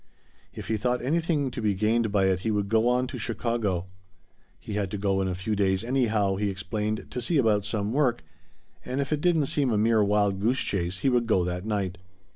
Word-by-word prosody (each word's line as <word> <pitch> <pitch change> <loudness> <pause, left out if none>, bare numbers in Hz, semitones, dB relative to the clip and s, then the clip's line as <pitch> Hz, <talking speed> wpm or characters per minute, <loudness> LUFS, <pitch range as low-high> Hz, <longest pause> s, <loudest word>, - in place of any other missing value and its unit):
If - - -8
he 110 - +1
thought 125 +3 -1
anything 150 -1 0
to 120 - -5
be 105 -2 +1
gained 110 +2 +1
by 100 -2 +2
it 95 -1 +2
he 110 - -2
would 105 -2 0
go 115 +1 +3
on 125 +1 +2
to 125 -1 -6
Chicago. 110 -6 -1 0.7
He 105 - -7
had 100 -2 -1
to 105 - -4
go 95 -1 0
in 95 - 0
a 90 - -2
few 100 +4 -2
days 95 -1 +1
anyhow, 110 -6 +1
he 105 0 0
explained, 105 +3 -3
to 125 - -3
see 160 +7 0
about 105 -6 +2
some 105 0 -2
work, 130 -4 +1 0.6
and 130 +2 -3
if 140 +2 -1
it 150 - -1
didn't 165 -4 +3
seem 135 -1 0
a 110 - +1
mere 110 0 +3
wild 100 -1 +1
goose 120 +6 +1
chase 90 -1 -2
he 135 - +3
would 120 -2 +1
go 95 -5 +3
that 90 +3 -4
night. 95 -4 -2
110 Hz, 225 wpm, -26 LUFS, 100-125 Hz, 0.7 s, go